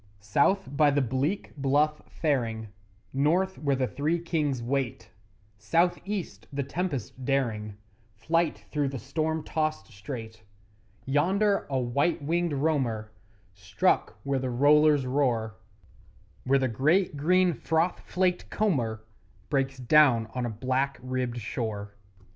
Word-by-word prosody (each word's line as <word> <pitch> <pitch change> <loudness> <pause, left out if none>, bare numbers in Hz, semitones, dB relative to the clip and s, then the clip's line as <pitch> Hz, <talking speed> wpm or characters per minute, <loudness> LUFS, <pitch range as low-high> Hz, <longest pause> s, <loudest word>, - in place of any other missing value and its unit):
South 140 - +2
by 150 +1 +5
the 145 0 +2
bleak 135 - -1
Bluff 145 +2 +1
faring, 115 -8 -1 0.4
North 175 +8 +1
where 140 -2 +1
the 130 0 +1
Three 150 +6 -1
Kings 150 -7 -1
wait, 130 -4 -2 0.5
South 170 - +2
east 200 -4 -5
the 140 0 -2
tempest 140 - -4
daring 115 -6 -1 0.4
Flight 165 +10 0
through 145 -2 0
the 135 0 -4
storm 155 +4 -2
tossed 155 -4 -2
strait; 110 +2 -8 0.6
Yonder 195 +9 +2
a 135 - 0
white 140 +8 +1
winged 170 +2 0
roamer 135 -8 0 0.4
Struck 95 -1 0
where 140 -1 0
the 130 0 -2
rollers 145 +2 +4
roar 125 -5 0 0.9
Where 135 +2 +4
the 135 -1 +1
great 150 - +2
green 180 +4 +3
froth 160 +4 0
flaked 180 -1 -1
comber 120 - -1 0.5
Breaks 135 -1 0
down 125 -3 +4
on 125 -1 -2
a - - -3
black 130 +5 -1
ribbed 130 -1 -2
shore. 105 -2 -4
140 Hz, 125 wpm, -27 LUFS, 120-160 Hz, 0.9 s, by